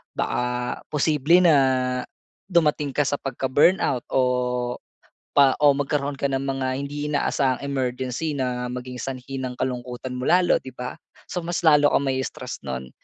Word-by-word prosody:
Baka 125 Hz, 0 st, -2 dB
posible 155 Hz, +3 st, +3 dB
na, 165 Hz, -4 st, +6 dB, 0.9 s
dumating 150 Hz, -6 st, +1 dB
ka 145 Hz, -, +3 dB
sa 145 Hz, 0 st, -1 dB
pagka-burnout 135 Hz, 0 st, +1 dB
o 130 Hz, -, +2 dB, 1.1 s
pa 140 Hz, -2 st, +5 dB
o 145 Hz, -, +8 dB
magkaroon 145 Hz, 0 st, -1 dB
ka -, -, 0 dB
ng 135 Hz, -1 st, -1 dB
mga 135 Hz, -1 st, -2 dB
hindi 145 Hz, +1 st, -4 dB
inaasahang 140 Hz, -3 st, 0 dB
emergency 130 Hz, +2 st, -2 dB
na 125 Hz, -2 st, -2 dB
maging 125 Hz, 0 st, -6 dB
sanhi 135 Hz, +1 st, -5 dB
ng 130 Hz, -1 st, -4 dB
kalungkutan 125 Hz, 0 st, -4 dB
mo 125 Hz, -, -4 dB
lalo 180 Hz, 0 st, +4 dB
'di 130 Hz, -, -11 dB
ba? 125 Hz, 0 st, -6 dB, 0.3 s
So, -, -, -3 dB
mas 175 Hz, +1 st, -2 dB
lalo 150 Hz, -3 st, +5 dB
kang -, -, +3 dB
mai-stress 130 Hz, 0 st, -3 dB
no'n. 65 Hz, -1 st, -5 dB
135 Hz, 145 wpm, -24 LUFS, 125-145 Hz, 1.1 s, o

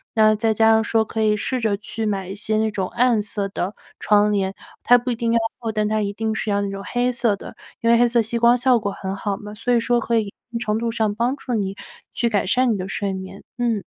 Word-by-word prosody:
那 215 Hz, -1 st, +5 dB
再 220 Hz, +1 st, +1 dB
加 220 Hz, +1 st, +4 dB
上 220 Hz, 0 st, +4 dB
说 225 Hz, -1 st, +1 dB
可 220 Hz, +1 st, -3 dB
以 210 Hz, -1 st, +3 dB
试 255 Hz, +3 st, -2 dB
着 210 Hz, -3 st, +1 dB
去 220 Hz, +2 st, -5 dB
买 195 Hz, -3 st, -2 dB
一 190 Hz, -, -5 dB
些 215 Hz, +1 st, -1 dB
那 220 Hz, 0 st, +1 dB
种 190 Hz, -3 st, -2 dB
暗 240 Hz, -3 st, +2 dB
色 205 Hz, -1 st, -3 dB
的 195 Hz, +1 st, -3 dB, 0.3 s
窗 210 Hz, 0 st, +3 dB
帘， 195 Hz, -2 st, 0 dB, 0.3 s
它 245 Hz, -, +6 dB
不 245 Hz, +1 st, -3 dB
一 -, -, -1 dB
定 230 Hz, 0 st, -1 dB
要 230 Hz, -, +3 dB, 0.2 s
厚， 225 Hz, -2 st, -3 dB
但 215 Hz, -1 st, 0 dB
它 215 Hz, 0 st, 0 dB
一 200 Hz, -1 st, -1 dB
定 220 Hz, +1 st, -2 dB
是 215 Hz, -, -2 dB
要 200 Hz, 0 st, +1 dB
那 200 Hz, -, -2 dB
种 195 Hz, 0 st, -6 dB
黑 245 Hz, +1 st, 0 dB
色 235 Hz, -4 st, +1 dB
的， -, -, -10 dB, 0.3 s
因 230 Hz, -, +2 dB
为 235 Hz, -, +6 dB
黑 240 Hz, -, +5 dB
色 235 Hz, -1 st, +3 dB
吸 225 Hz, +2 st, -2 dB
光 235 Hz, +1 st, +5 dB
效 250 Hz, 0 st, +4 dB
果 205 Hz, -2 st, -2 dB
很 195 Hz, 0 st, -5 dB
好 200 Hz, 0 st, -3 dB
嘛， 210 Hz, 0 st, -9 dB
所 225 Hz, +3 st, -1 dB
以 235 Hz, -, +4 dB
说 240 Hz, +1 st, +1 dB
可 230 Hz, +1 st, +1 dB
以 225 Hz, -, +3 dB
一 200 Hz, -, -10 dB, 0.2 s
定 230 Hz, -, -3 dB
程 210 Hz, -2 st, -1 dB
度 230 Hz, 0 st, -1 dB
上 220 Hz, -2 st, 0 dB
帮 240 Hz, +4 st, 0 dB
助 250 Hz, -, -5 dB
你 195 Hz, -3 st, -1 dB, 0.4 s
去 240 Hz, -, 0 dB
改 210 Hz, -4 st, +1 dB
善 250 Hz, +2 st, +3 dB
你 -, -, -2 dB
的 185 Hz, 0 st, -4 dB
睡 195 Hz, 0 st, -2 dB
眠。 190 Hz, +1 st, -8 dB, 0.2 s
嗯。 230 Hz, -5 st, 0 dB
220 Hz, 295 characters per minute, -22 LUFS, 205-235 Hz, 0.4 s, 它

